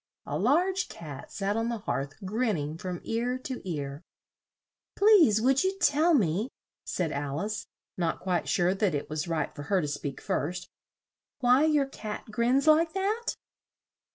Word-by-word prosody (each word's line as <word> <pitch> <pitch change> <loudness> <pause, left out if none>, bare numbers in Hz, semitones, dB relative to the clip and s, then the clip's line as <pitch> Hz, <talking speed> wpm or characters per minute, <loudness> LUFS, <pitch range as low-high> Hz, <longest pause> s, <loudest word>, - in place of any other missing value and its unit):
A - - -3
large 375 +2 +2
cat 145 -5 -9
sat 200 0 -1
on 225 +1 0
the 235 - -2
hearth 140 - -3
grin 220 +2 0
ning 150 0 -3
from 180 -1 -5
ear 240 +3 -1
to 255 0 -6
ear. 140 -2 -4 0.9
"Please, 380 - +6
would 265 +4 +3
you 380 +1 0
tell 325 -1 +4
me," 205 - +1 0.3
said 170 -4 -2
Al 140 +1 -3
ice, 210 +2 -3 0.3
not 170 -2 -1
quite 180 -3 -1
sure 180 +1 +2
that 195 -4 +1
it 145 - -4
was 155 +2 -2
right 165 -2 -1
for - - -8
her 185 +6 +1
to 155 - -1
speak 145 -1 -4
first, 175 +4 -2 0.7
"why 250 +4 +5
your 300 -3 +3
cat 215 -6 -7
grins 245 +5 +2
like 315 +1 +5
that?" 415 +5 -1
210 Hz, 165 wpm, -28 LUFS, 165-275 Hz, 0.9 s, Please